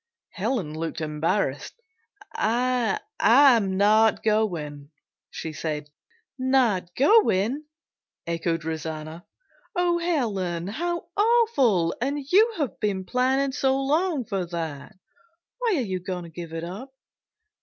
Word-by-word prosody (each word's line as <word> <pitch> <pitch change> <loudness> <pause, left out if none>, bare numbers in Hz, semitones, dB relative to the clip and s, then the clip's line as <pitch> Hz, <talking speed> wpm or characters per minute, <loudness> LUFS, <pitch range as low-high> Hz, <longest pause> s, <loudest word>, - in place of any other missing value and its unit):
Helen 200 - -2
looked 160 +1 -4
embarrassed. 150 -1 -1 0.6
"I 240 0 +1 0.2
am 230 -5 +5
not 215 +2 +4
going," 165 -10 -1 0.4
she 160 - -6
said. 150 -1 -4 0.5
"Not 240 -9 +1
going?" 280 - +3 0.6
echoed 165 -1 -2
Rosanna. 160 +1 -5 0.5
"Oh, 350 -1 +2
Helen, 205 - -1
how 345 - -3
awful! 410 - +3
And 280 +4 0
you 435 +5 +5
have 290 -6 -3
been 195 -3 -1
planning 260 +5 +1
so 265 0 +1
long 300 0 0
for 195 -2 -2
that. 165 +2 -6 0.6
Why 475 -4 +1
are - - +1
you 185 -2 -3
going 180 0 -5
to 170 - -10
give 165 0 -8
it 165 0 -5
up?" 195 +10 -7
210 Hz, 115 wpm, -25 LUFS, 170-270 Hz, 0.6 s, am